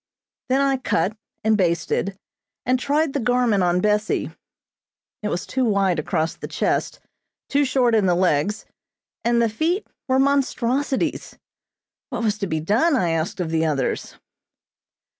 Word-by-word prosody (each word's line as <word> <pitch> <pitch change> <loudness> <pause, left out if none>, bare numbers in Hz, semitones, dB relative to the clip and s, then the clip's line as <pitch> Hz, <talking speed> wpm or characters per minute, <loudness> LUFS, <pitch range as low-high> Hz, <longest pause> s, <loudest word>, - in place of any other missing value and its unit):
Then 265 +2 +3
I 275 -1 +2
cut, 200 -5 0 0.3
and 220 0 +3
basted, 180 +1 0 0.5
and 255 0 +2
tried 290 +2 +1
the 285 - 0
garment 245 -4 +2
on 180 0 +2
Bessie. 210 +1 0 0.9
It 210 - -2
was 180 - -2
too 260 - -1
wide 200 -6 +2
across 160 +1 -1
the - - -7
chest, - - -1 0.5
too 285 +1 +3
short 255 -3 +2
in 210 -4 +3
the 175 - +3
legs, 180 +3 +1 0.6
and 235 0 +2
the 230 - +3
feet 325 - -1 0.2
were 260 -1 +2
monstrosities. 270 -1 0 0.7
What 235 -2 -3
was 210 -1 0
to 200 - -2
be 160 -2 -1
done, 230 - +2
I 175 -9 +1
asked 165 +3 -2
of 170 -3 -2
the 160 0 +1
others? 140 -4 -2
215 Hz, 150 wpm, -22 LUFS, 180-260 Hz, 0.9 s, Then